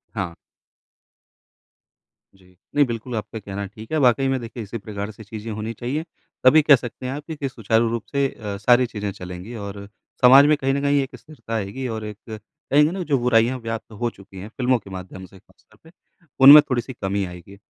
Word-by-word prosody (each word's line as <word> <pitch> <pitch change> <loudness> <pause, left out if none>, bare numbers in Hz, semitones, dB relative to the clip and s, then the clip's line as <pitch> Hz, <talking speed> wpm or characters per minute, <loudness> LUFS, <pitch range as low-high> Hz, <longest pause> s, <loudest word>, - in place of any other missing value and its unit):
हाँ। 95 -5 -3 2.0
जी। 90 -1 -23 0.2
नहीं 145 0 +5
बिल्कुल 120 0 -5
आपका 110 +1 -5
कहना 100 0 -6
ठीक 110 +3 -12
है। 155 - +1
वाक़ई 135 -1 +3
में 135 0 0
देखिए 115 0 -7
इसी 105 +3 -6
प्रकार 105 -1 -6
से 110 +1 -13
चीज़ें 110 +1 -7
होनी 110 +2 -4
चाहिए। 125 +8 -3 0.4
तभी 150 +5 +7
कह 150 -1 +7
सकते 120 0 -7
हैं 130 - -3
आप 145 +1 -6
कि 160 - -5
कि 140 -2 -4
सुचारू 115 -1 +1
रूप 115 -1 -3
से 140 -1 +1
अ, 105 -6 -7
सारी 120 +5 +4
चीज़ें 105 -4 -5
चलेंगी 90 +3 -9
और 100 -2 -7
अ, 100 - -10 0.3
समाज 135 +3 +8
में 150 +1 +4
कहीं 135 -1 0
न 140 - -1
कहीं 140 0 +2
एक 135 - -9
स्थिरता 150 -7 -11
आएगी 110 +5 -4
और 110 -2 -5
एक 105 -1 -7
कहेंगे 150 +6 0
ना 185 0 -4
जो 140 - +4
बुराइयाँ 120 +1 +2
व्याप्त 115 -1 -6
हो 120 - +1
चुकी 100 -3 -16
हैं 100 +3 -8
फिल्मों 125 0 +2
के 100 - -15
माध्यम 95 0 -8
से 95 +1 -17
ख़ासतौर - - -28
पे 160 - -17 0.5
उनमें 145 +3 +12
थोड़ी-सी 125 0 -2
कमी 100 -2 -2
आएगी। 90 +2 -11
115 Hz, 205 wpm, -22 LUFS, 100-135 Hz, 2.0 s, उनमें